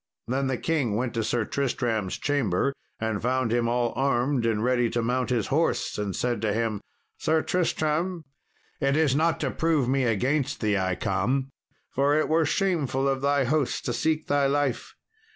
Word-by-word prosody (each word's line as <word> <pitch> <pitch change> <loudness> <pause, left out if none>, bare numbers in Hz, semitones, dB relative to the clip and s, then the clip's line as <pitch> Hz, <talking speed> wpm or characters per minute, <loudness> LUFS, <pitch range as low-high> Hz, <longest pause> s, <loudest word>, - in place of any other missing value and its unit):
Then 135 +3 0
the 130 -1 -1
king 140 -10 0
went 120 +2 -1
to 115 - -1
Sir 110 0 0
Tristram's 120 -8 -1
chamber 140 -3 0 0.3
and 110 -2 -2
found 125 -1 0
him 120 -1 +1
all 120 -1 0
armed 130 -1 +1
and 110 -1 0
ready 120 -1 +2
to 120 0 -1
mount 125 +2 0
his 120 -4 +1
horse, 160 +3 +1
and 100 -2 -2
said 120 -4 -1
to 110 -2 +1
him, 110 -2 -1 0.4
"Sir 160 0 +1
Tristram, 170 0 -1 0.5
it 140 0 +1
is 150 -4 +3
not 160 +2 +2
to - - 0
prove 160 -6 +1
me 135 0 +1
against 125 +6 0
thee 105 -2 +1
I 95 -1 0
come, 120 +9 -1 0.4
for 140 +2 +2
it 155 - +1
were 160 0 +3
shameful 150 -10 0
of 135 -1 0
thy 140 0 +2
host 140 +1 0
to 120 - -1
seek 155 +6 0
thy 145 -1 +2
life. 140 -2 -1
130 Hz, 180 wpm, -26 LUFS, 115-145 Hz, 0.5 s, is